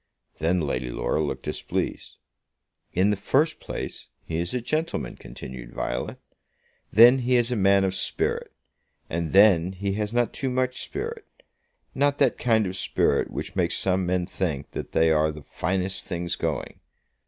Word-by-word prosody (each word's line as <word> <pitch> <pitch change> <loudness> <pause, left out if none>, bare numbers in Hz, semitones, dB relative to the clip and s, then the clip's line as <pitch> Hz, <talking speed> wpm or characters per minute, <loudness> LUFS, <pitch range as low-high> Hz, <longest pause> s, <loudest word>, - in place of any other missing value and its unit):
Then 85 +3 +2
Lady 65 -4 -2
Laura 75 - -1
looked 75 - -3
displeased. - - -3 0.7
"In 95 +3 +3
the - - +2
first 145 - +1
place, - - -6 0.2
he 80 0 -2
is 85 +1 -2
a 125 - -1
gentleman," 155 +7 -2
continued - - -9
Violet. - - -3 0.7
"Then 120 +4 +8
he 125 0 +2
is 120 0 +2
a - - +1
man 100 -1 +4
of 95 -1 +1
spirit. 95 - -1 0.6
And 85 -1 -2
then 95 -3 +5
he 100 +1 -2
has 105 0 -2
not 120 0 +1
too 135 - -2
much 130 0 -1
spirit; 450 +2 -5 0.7
not 145 +1 +2
that - - +2
kind 110 -3 +3
of 95 0 -4
spirit 95 - +1
which - - -6
makes - - +1
some 95 -1 +1
men 90 0 +1
think 80 -7 -3
that - - -6
they 80 0 +4
are 80 0 +3
the 75 -1 -10
finest 95 +5 -2
things 85 0 -2
going. - - -3
95 Hz, 165 wpm, -25 LUFS, 80-120 Hz, 0.7 s, Then